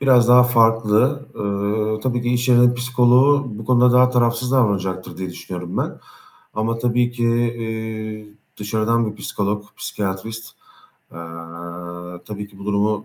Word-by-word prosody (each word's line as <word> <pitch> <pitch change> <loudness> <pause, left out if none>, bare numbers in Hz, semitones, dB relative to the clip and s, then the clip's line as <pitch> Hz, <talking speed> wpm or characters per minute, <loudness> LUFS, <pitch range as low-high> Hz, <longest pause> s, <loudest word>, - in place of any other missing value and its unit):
biraz 125 -3 +4
daha 125 0 +8
farklı. 115 +3 +2
Eee, 105 +1 -1
tabii 120 0 -1
ki 120 - -2
iş 120 +1 0
yerinin 120 0 +5
psikoloğu 125 +3 +3
bu 110 +1 -8
konuda 125 +1 +4
daha 125 0 +5
tarafsız 120 0 +1
davranacaktır 95 -7 0
diye 95 -1 -5
düşünüyorum 90 0 -7
ben - - -3 0.6
ama 115 +1 -1
tabii 120 +1 +1
ki, 120 -1 -2
eee, 110 -2 -3 0.3
dışarıdan 110 +2 0
bir 105 - -12
psikolog, 105 0 -2
psikiyatrist, 105 +3 -4 0.7
eee, - - -10 1.1
tabii 105 -1 -7
ki 100 -1 -18
bu 100 - -10
durumu 105 +1 0
115 Hz, 140 wpm, -20 LUFS, 105-125 Hz, 1.1 s, daha